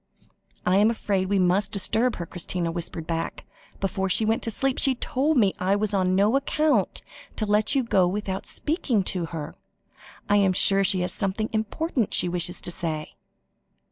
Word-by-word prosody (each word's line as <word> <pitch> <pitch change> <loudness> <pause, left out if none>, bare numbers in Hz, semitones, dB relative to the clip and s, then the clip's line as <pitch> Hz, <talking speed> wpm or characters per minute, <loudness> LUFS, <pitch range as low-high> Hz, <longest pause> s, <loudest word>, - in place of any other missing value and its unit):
"I 180 +1 +3
am 210 +2 +5
afraid 195 -4 -1
we 200 - +2
must 185 +2 +2
disturb 225 +5 +1
her," 170 - -5
Christina 175 0 -3
whispered 165 -1 -5
back. 165 0 -4 0.3
"Before 190 0 -2
she 215 +4 +3
went 225 +1 +1
to - - -3
sleep, 270 +4 0
she 265 -2 +3
told 275 +5 0
me 200 -5 +3
I 190 +2 +1
was 210 0 -1
on 185 -1 +1
no 205 +6 +3
account 275 -5 +1 0.3
to 215 - -2
let 210 +5 +2
you 270 - +2
go 190 -6 +2
without 190 0 -3
speaking 275 - 0
to 180 -3 -2
her. 160 -2 -6 0.7
I 205 - +3
am 195 -2 +3
sure 195 +2 +4
she 190 -1 +2
has 180 - -2
something 210 +2 -2
important 225 - -1
she - - +3
wishes 175 0 0
to - - -3
say." 160 -3 -4
195 Hz, 180 wpm, -25 LUFS, 180-220 Hz, 0.7 s, am